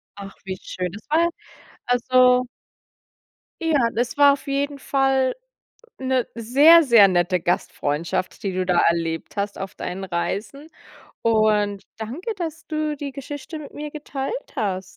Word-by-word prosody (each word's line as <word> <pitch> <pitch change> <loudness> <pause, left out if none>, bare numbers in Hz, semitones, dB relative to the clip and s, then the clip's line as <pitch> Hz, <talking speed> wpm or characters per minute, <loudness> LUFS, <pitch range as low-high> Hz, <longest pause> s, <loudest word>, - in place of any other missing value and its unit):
Ach, 195 -1 -9
wie 190 -1 -5
schön. 180 -1 -4
Das 205 +3 -12
war 335 +2 +3 0.6
also 250 0 +4 1.2
Ja, 325 -3 +2 0.2
das 240 +4 -2
war 285 -1 +7
auf 280 - -7
jeden 280 0 -1
Fall 270 -1 +1 0.7
'ne 260 -2 0
sehr, 280 +9 +6
sehr 230 -8 +7
nette 180 0 +1
Gastfreundschaft, 170 +1 -2
die 195 - -2
du 185 0 -1
da 180 -1 +2
erlebt 165 +2 0
hast 200 0 -2
auf 195 0 -6
deinen 190 +2 -5
Reisen 205 - -4 0.5
und 215 -3 +2
danke, 285 - -5
dass 325 -3 -5
du 305 -1 -2
die 280 -2 -5
Geschichte 290 +3 -7
mit 295 - -10
mir 300 0 -6
geteilt 295 - -4 0.2
hast. 195 -7 -1
245 Hz, 140 wpm, -22 LUFS, 195-285 Hz, 1.2 s, war